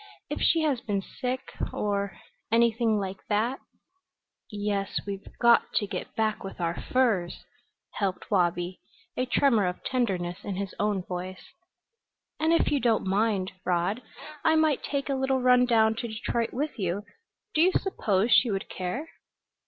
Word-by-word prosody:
"If - - -3
she 330 - +4
has 280 -6 +1
been 200 -4 -1
sick 255 +3 -4 0.2
or 200 -1 -1 0.3
anything 230 -1 +3
like 195 -1 -3
that 225 +6 +1 0.5
" - - -60
"Yes, 205 -2 -2
we've 200 -1 -6
got 235 -1 +5
to 210 - +2
get 200 - -6
back 220 -1 0
with 195 - -8
our 170 -1 0
furs," 205 -6 0 0.5
helped 195 0 -3
Wabi, 175 -1 +1 0.3
a 255 - -1
tremor 235 -7 +3
of 180 - -4
tenderness 185 -9 -1
in 200 - -3
his 195 0 -4
own 205 -3 +1
voice. 185 +1 -7 0.9
"And 315 +1 +2
if 335 - +3
you 290 - +2
don't 230 -5 +2
mind, 195 -1 +1
Rod, 180 +6 0 0.4
I 320 - +4
might 315 -3 +3
take 280 -1 -2
a 280 - 0
little 265 0 +1
run 250 0 +5
down 220 -2 +4
to 235 - -3
Detroit 230 +1 -2
with 285 0 -3
you. 190 +1 -1 0.5
Do 310 - +3
you 365 +3 +6
suppose 220 - +1
she 245 - +6
would 195 -2 -2
care?" 190 - -4
215 Hz, 160 wpm, -27 LUFS, 195-250 Hz, 0.9 s, you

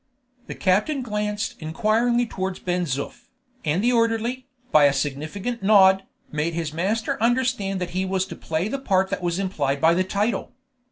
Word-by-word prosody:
The - - -6
captain 215 +10 +1
glanced 210 -2 -2
inquiringly 225 +8 +1
towards 190 -4 -4
Ben 180 0 -1
Zoof, 140 -2 -4 0.4
and 160 +6 0
the 245 +1 +3
orderly, 230 +2 0 0.2
by 150 -1 +6
a 140 - +4
significant 155 - -3
nod, 195 -1 +6 0.3
made 155 +2 -1
his 165 -3 -3
master 210 +7 -1
understand 235 -5 +1
that 180 -1 -4
he 185 +1 -1
was 190 0 0
to - - -8
play 160 +4 -2
the 275 +5 -3
part 190 -7 +1
that - - -2
was 175 -1 -1
implied 145 -8 -1
by 165 +3 +5
the 185 +2 +2
title. 205 +5 -1
190 Hz, 170 wpm, -24 LUFS, 170-225 Hz, 0.4 s, by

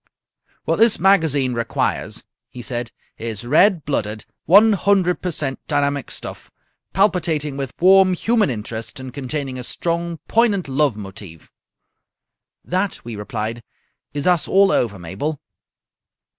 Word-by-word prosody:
"What - - +1
this 225 -1 +5
magazine 160 -9 +3
requires," 115 -1 -2 0.3
he 125 - -9
said, 120 -1 -4 0.3
"is 115 0 -5
red 165 - +4
blooded, 110 -6 -2 0.2
one 210 +5 +7
hundred 190 -2 +2
per 180 - -2
cent 145 -5 -2
dynamic 140 -2 0
stuff, - - -6 0.4
palpitating 165 -7 +1
with 135 -2 -5
warm 185 +1 +6
human 220 +1 +2
interest 110 0 -5
and 130 -1 -8
containing 135 -1 -4
a - - -6
strong, 170 +4 -2
poignant 215 -7 +2
love 135 -3 +1
motive." 95 -5 -10 1.1
"That," 185 -3 -2
we 120 -2 -6
replied, 110 +3 -4 0.5
"is 145 -1 -3
us 180 -3 +2
all 195 0 +4
over, 105 -5 0
Mabel." 100 - -4
145 Hz, 130 wpm, -20 LUFS, 120-185 Hz, 1.1 s, one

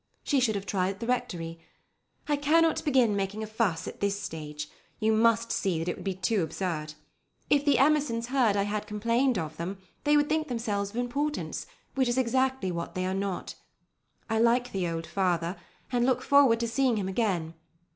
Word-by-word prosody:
She 285 - +2
should 230 -4 +2
have 200 -1 -3
tried 185 -1 0
at - - -21
the 230 - -4
Rectory. 170 -9 -2 0.7
I 295 - +2
cannot 315 +3 +3
begin 255 -8 +3
making 200 +2 -2
a - - -2
fuss 215 -6 -1
at - - -7
this 200 0 0
stage. 150 -4 -6 0.3
You 220 0 +2
must 230 +1 +3
see 190 -5 0
that 165 +2 -3
it 175 - -1
would - - -10
be 195 -2 -2
too 190 +2 +1
absurd. 155 -2 -3 0.6
If 290 0 +4
the 285 - +4
Emersons 275 -5 +2
heard 245 -6 +3
I 200 - +2
had 210 +1 -3
complained 230 +4 +1
of 160 -3 -4
them, 180 +4 -4 0.3
they 295 0 +4
would 290 0 +3
think 310 0 0
themselves 210 -5 -2
of 210 - -14
importance, 280 +5 -2 0.3
which 265 -1 +1
is 240 +1 0
exactly 260 -4 +1
what 170 -1 -5
they 185 0 -1
are 185 - -1
not. 195 -1 -3 0.7
I 220 0 0
like 240 +2 +3
the 185 -3 -1
old 165 0 -3
father, 175 -2 0 0.4
and 245 -1 +2
look 255 0 +2
forward 275 -5 +5
to 235 - 0
seeing 240 0 +1
him 195 -2 -2
again. 190 -6 -1
220 Hz, 195 wpm, -28 LUFS, 185-255 Hz, 0.7 s, forward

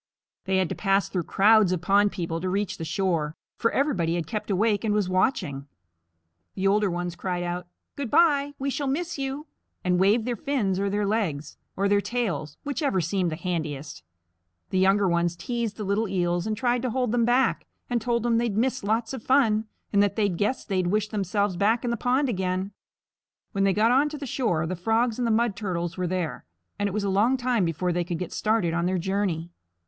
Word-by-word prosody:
They 190 0 +1
had 190 -2 +2
to - - -2
pass 195 -1 +1
through 180 -4 -2
crowds 210 -1 +5
of 185 - 0
pond 205 +1 +4
people 165 -2 -3
to 185 - -1
reach 200 +1 -2
the - - -3
shore, 165 -4 -1 0.2
for 230 - +1
everybody 185 - 0
had 170 -2 -2
kept 210 +7 -4
awake 205 +1 +1
and 210 -2 +1
was 205 -3 +1
watching. 180 - 0 0.9
The 190 - -2
older 205 +1 +3
ones 175 0 -3
cried 180 0 -3
out, 175 0 -4 0.3
"Good 280 -4 -4
bye; 290 -2 +3
we 275 +1 -2
shall 285 +1 -2
miss 330 +3 -2
you," 275 +2 -3 0.4
and 180 -1 +2
waved 210 +4 +3
their 245 -1 -1
fins 210 -7 -1
or 200 0 0
their 205 +1 0
legs, 185 -9 -1 0.2
or 200 +1 +2
their 200 0 +3
tails, 200 - -3
whichever 285 - 0
seemed 175 +1 0
the - - -2
handiest. 155 -5 -4 0.7
The 185 - +1
younger 195 +1 +4
ones 170 0 +1
teased 235 +2 -3
the 215 - -4
little 205 +3 0
Eels 175 -1 0
and 215 -1 -2
tried 245 0 +1
to 255 - -1
hold 250 -1 0
them 240 0 +2
back, 245 +3 +2 0.2
and 240 -2 0
told 235 0 0
them 235 -1 +2
they'd 230 -4 -1
miss 255 +1 0
lots 225 +3 0
of 265 - -5
fun, 225 -4 +3 0.3
and 200 - +5
that 200 -1 +1
they 210 -2 +2
guessed 205 +8 -1
they'd 185 -3 0
wish 210 +3 0
themselves 200 -2 -1
back 220 +5 +2
in 240 - 0
the - - +1
pond 255 +5 +1
again. 190 -3 -1 0.8
When 195 -2 +1
they 195 - +4
got 220 +4 +3
onto 295 +4 +2
the 285 - -6
shore, 215 -11 0
the 180 +3 -3
Frogs 225 +6 +1
and 245 - +1
the - - +1
Mud 225 -1 +2
Turtles 175 -4 -3
were 180 -1 -2
there, 180 -3 -3 0.4
and 205 - +1
it - - -3
was 210 +2 -2
a - - 0
long 220 +7 +3
time 245 -6 +1
before 170 +2 -1
they 175 0 0
could 175 0 -3
get 180 0 -5
started 215 -6 +1
on 170 +1 0
their 185 0 0
journey. 175 -2 -1
200 Hz, 215 wpm, -26 LUFS, 180-235 Hz, 0.9 s, crowds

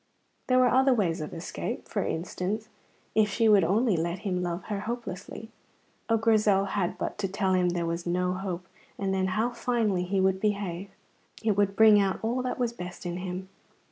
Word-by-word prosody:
There 255 - +3
were 255 0 +5
other 265 0 +4
ways 175 -8 0
of 150 - -5
escape. 165 - -5
For - - -1
instance, 190 +6 -3 0.4
if 215 -1 +3
she 225 +3 +2
would 205 -3 +6
only 205 +5 +2
let 170 +3 -2
him 180 -2 0
love 175 0 -3
her 205 -2 -3
hopelessly. 220 -1 -6 0.6
Oh, 225 - +4
Grizel 215 -3 +3
had 190 -3 -1
but - - -4
to 200 - 0
tell 190 0 0
him 180 -1 +3
there 175 -1 -1
was 170 +1 -3
no 180 +1 +1
hope, 185 -1 -4 0.3
and 195 -1 -1
then 190 0 +1
how 220 +6 0
finely 230 -7 0
he 195 +2 0
would 190 0 +2
behave! 200 -3 -2 0.5
It 215 -2 +2
would 200 -1 +1
bring 215 -1 +7
out 195 -1 0
all 240 +3 0
that 250 0 -3
was 240 -2 -1
best 180 -4 -8
in 175 0 -3
him. 185 0 -5
195 Hz, 195 wpm, -28 LUFS, 180-220 Hz, 0.6 s, bring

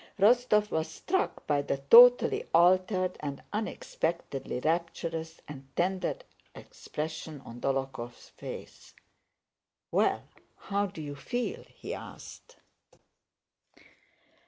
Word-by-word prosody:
Rostóv 210 0 +4
was 160 0 0
struck 360 - -2
by 145 -1 +2
the 140 - -2
totally 240 - +7
altered 185 +2 +3
and 140 -2 -5
unexpectedly 170 - -3
rapturous 165 +1 -2
and 135 -2 -9
tender 185 - 0 0.4
expression 155 - -6
on 120 -2 -11
Dólokhov's 135 -3 -3
face. - - -10 1.0
"Well? - - +2 0.3
How 200 0 -1
do 185 -5 -8
you 145 -1 -5
feel?" 245 - -3
he - - -7
asked. 485 - -10
165 Hz, 95 wpm, -30 LUFS, 145-205 Hz, 1.0 s, totally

